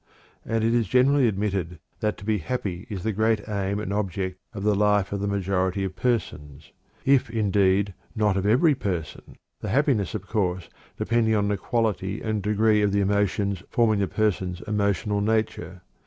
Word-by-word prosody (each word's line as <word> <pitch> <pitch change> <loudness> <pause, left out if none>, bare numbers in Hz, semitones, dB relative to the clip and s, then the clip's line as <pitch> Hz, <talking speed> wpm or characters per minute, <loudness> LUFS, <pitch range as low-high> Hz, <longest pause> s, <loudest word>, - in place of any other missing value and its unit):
And 115 -1 -1
it 115 +1 +2
is 120 -3 +2
generally 130 +4 +4
admitted 95 -5 -2 0.2
that 105 -1 -1
to - - -11
be 110 -1 +1
happy 95 -1 -4
is 95 -5 -5
the 110 - 0
great 110 0 +1
aim 100 -1 -2
and 100 -2 -3
object 95 -2 -2
of 100 -3 -6
the 105 0 +3
life 105 -1 +2
of 100 - -2
the 100 - -2
majority 95 -1 0
of 95 -1 -4
persons, 75 - -3 0.3
if, 135 -1 +3
indeed, 100 -2 +2 0.2
not 105 -3 +2
of 100 +1 0
every 140 +9 +4
person, 90 - -5 0.2
the - - -5
happiness, 120 - +1
of 100 -2 -5
course, 95 -4 -1 0.3
depending 115 -1 +1
upon 100 -1 +1
the 105 - +1
quality 105 -2 -1
and 110 -2 -2
degree 105 +1 +2
of 105 -1 +2
the 100 0 +2
emotions 100 -1 0
forming 110 -3 +2
the 100 - +1
person's 95 -4 -1
emotional 105 -1 0
nature. 100 -5 -1
100 Hz, 175 wpm, -25 LUFS, 95-110 Hz, 0.3 s, generally